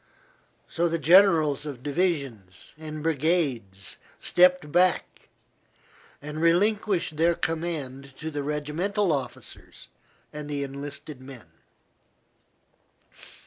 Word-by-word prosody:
So 170 +1 0
the 165 - 0
generals 160 -3 +5
of 130 -4 -7
divisions 140 - -2
and 155 -1 -7
brigades 140 - -1 0.2
stepped 180 -4 +3
back 180 +2 +1 0.9
and 150 +1 -5
relinquished 185 -1 +2
their 170 +2 +3
command 145 -6 -4
to 160 0 -5
the 145 -1 -3
regimental 155 +6 -1
officers 135 -3 -7 0.4
and 150 0 -7
the 145 -1 -1
enlisted 140 0 -7
men. 130 -10 -12
150 Hz, 95 wpm, -26 LUFS, 140-170 Hz, 0.9 s, generals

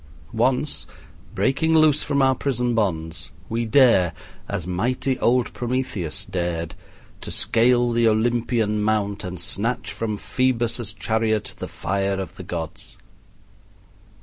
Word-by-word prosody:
Once, 125 +5 0 0.5
breaking 160 +5 +2
loose 155 -1 +5
from 140 -2 +1
our 130 0 +5
prison 125 -2 -1
bonds, 80 -7 -1 0.2
we 115 +1 -1
dare, 110 -8 +5 0.4
as 100 -5 -3
mighty 125 +8 -1
old 125 0 +2
Prometheus 120 -10 -2
dared, 85 -2 -3 0.5
to - - -7
scale 120 +1 +3
the 115 0 +3
Olympian 110 -1 +1
mount 105 -1 0
and 90 -1 -5
snatch 100 +7 -2
from 110 -2 -3
Phoebus' 120 -3 0
chariot 110 0 0
the - - -4
fire 100 +1 -1
of 95 - -5
the 90 - -7
gods. 85 -3 -6
115 Hz, 120 wpm, -23 LUFS, 95-125 Hz, 0.5 s, loose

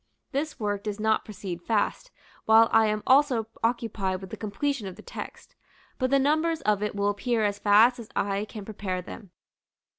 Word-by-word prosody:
This 295 +2 -3
work 205 -2 -1
does 210 0 -3
not 220 0 +2
proceed 185 -4 -6
fast, 225 - -1 0.4
while 225 +1 +6
I 225 -1 +5
am 215 0 -1
also 260 -4 +4 0.2
occupied 220 -5 -1
with 190 -1 -10
the - - -4
completion 220 +2 -3
of 185 - -7
the - - -13
text; - - -9 0.5
but 255 -1 +1
the 275 - +4
numbers 315 +4 +1
of 210 -1 +1
it 210 -1 -2
will 200 0 +1
appear 220 +3 0
as 205 0 -1
fast 220 +4 +5
as 225 - -9
I 200 +1 0
can 210 -1 -9
prepare 190 -4 -4
them. 200 +2 -10
215 Hz, 185 wpm, -27 LUFS, 200-245 Hz, 0.5 s, while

